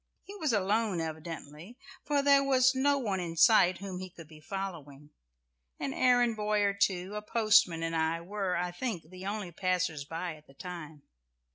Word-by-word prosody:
He 400 Hz, -, -11 dB
was 310 Hz, -7 st, 0 dB
alone 210 Hz, -2 st, +1 dB
evidently, 160 Hz, -, -7 dB, 0.3 s
for 290 Hz, -1 st, +1 dB
there 280 Hz, 0 st, +5 dB
was 255 Hz, -2 st, +4 dB
no 280 Hz, +2 st, +2 dB
one 205 Hz, -8 st, -1 dB
in 165 Hz, -2 st, -5 dB
sight 185 Hz, -4 st, +5 dB
whom 190 Hz, -1 st, -6 dB
he 185 Hz, 0 st, -7 dB
could 165 Hz, -2 st, -13 dB
be 155 Hz, -1 st, -14 dB
following 155 Hz, -6 st, -7 dB, 0.7 s
an 270 Hz, -, -3 dB
errand 245 Hz, -3 st, +3 dB
boy 210 Hz, 0 st, 0 dB
or 200 Hz, -1 st, +2 dB
two, 190 Hz, -1 st, 0 dB
a 210 Hz, -, -4 dB
postman 215 Hz, -6 st, +3 dB
and 165 Hz, 0 st, -2 dB
I, 160 Hz, +1 st, 0 dB
were, 190 Hz, +1 st, -3 dB
I 175 Hz, 0 st, -2 dB
think, 175 Hz, -5 st, -5 dB
the 185 Hz, +1 st, -8 dB
only 205 Hz, -3 st, -4 dB
passers 180 Hz, -4 st, -1 dB
by 165 Hz, +3 st, -5 dB
at 150 Hz, -, -21 dB
the 135 Hz, -, -19 dB
time. 160 Hz, -4 st, -8 dB
185 Hz, 180 wpm, -30 LUFS, 165-220 Hz, 0.7 s, there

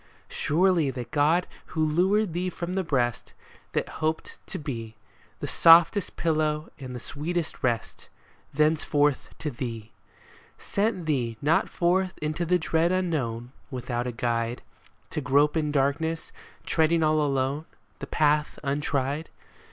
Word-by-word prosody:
Surely 170 Hz, -1 st, +2 dB
that 125 Hz, -2 st, -6 dB
God 155 Hz, +5 st, +3 dB, 0.3 s
who 155 Hz, -, +3 dB
lured 185 Hz, +5 st, +2 dB
thee 180 Hz, +2 st, -1 dB
from 175 Hz, 0 st, -5 dB
the 190 Hz, 0 st, 0 dB
breast 125 Hz, -7 st, -1 dB, 0.4 s
That -, -, 0 dB
hoped 155 Hz, 0 st, -2 dB
to -, -, -5 dB
be 115 Hz, -7 st, -6 dB, 0.5 s
The -, -, -2 dB
softest 165 Hz, +3 st, +6 dB
pillow 155 Hz, -1 st, 0 dB
and 130 Hz, -2 st, -7 dB
the -, -, -5 dB
sweetest 160 Hz, +6 st, -3 dB
rest 120 Hz, -3 st, -2 dB, 0.4 s
Thenceforth 150 Hz, -1 st, +2 dB
to 150 Hz, -, -3 dB
thee, 115 Hz, -3 st, -6 dB, 0.7 s
Sent 200 Hz, -4 st, -1 dB
thee 120 Hz, -7 st, -1 dB
not 155 Hz, +3 st, +2 dB
forth 185 Hz, +1 st, +1 dB
into 155 Hz, +3 st, -2 dB
the 180 Hz, +1 st, +4 dB
dread 165 Hz, 0 st, +1 dB
unknown 130 Hz, -11 st, -1 dB, 0.2 s
Without 125 Hz, -2 st, -3 dB
a -, -, -2 dB
guide, 115 Hz, 0 st, -2 dB, 0.5 s
To -, -, -2 dB
grope 145 Hz, +3 st, +3 dB
in 150 Hz, -2 st, 0 dB
darkness, 150 Hz, +4 st, 0 dB, 0.3 s
treading 165 Hz, 0 st, +2 dB
all 155 Hz, 0 st, +3 dB
alone 140 Hz, +1 st, 0 dB, 0.3 s
The -, -, -6 dB
path 150 Hz, 0 st, +1 dB
untried. 140 Hz, +1 st, -1 dB
150 Hz, 135 wpm, -26 LUFS, 135-165 Hz, 0.7 s, softest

